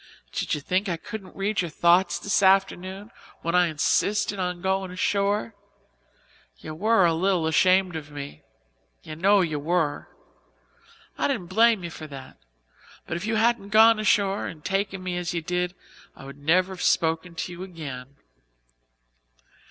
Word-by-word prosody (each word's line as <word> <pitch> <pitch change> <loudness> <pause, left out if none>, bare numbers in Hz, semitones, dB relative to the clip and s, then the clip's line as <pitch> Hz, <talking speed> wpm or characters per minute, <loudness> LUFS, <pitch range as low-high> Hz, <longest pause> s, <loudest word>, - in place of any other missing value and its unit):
Did - - -2
you 150 - -6
think 185 +6 -1
I 170 - -1
couldn't 200 +2 -9
read 195 0 -1
your 175 - -4
thoughts 175 +3 +3
this 205 - 0
afternoon, 195 +1 +1 0.3
when 170 - -1
I 180 -1 +4
insisted 200 +6 0
on 180 -1 -2
going 190 +1 -1
ashore? 200 +4 0 1.0
You 155 - -8
were 205 +3 +3
a 165 - +3
little 180 0 +1
ashamed 185 +2 +3
of 155 -2 -6
me 145 -1 -8 0.6
you 155 - -8
know 195 +5 +4
you 155 -4 -1
were. 155 -1 -1 1.1
I - - +2
didn't 175 0 -3
blame 225 -1 +4
you 170 - -5
for 155 -1 -9
that, 135 -2 -11 0.7
but - - -4
if 170 +5 -4
you 225 - 0
hadn't 220 -2 +1
gone 220 +1 +6
ashore 200 -2 +1
and 155 -2 -10
taken 195 -1 -2
me 180 -1 -3
as 175 0 -3
you 170 - -1
did 180 +2 -2 0.4
I 135 - -12
would 140 +1 -11
never 180 +6 +2
have 180 - -9
spoken 165 +1 +1
to 180 - -4
you 175 +1 -9
again. 140 -8 -8
180 Hz, 160 wpm, -25 LUFS, 165-195 Hz, 1.1 s, gone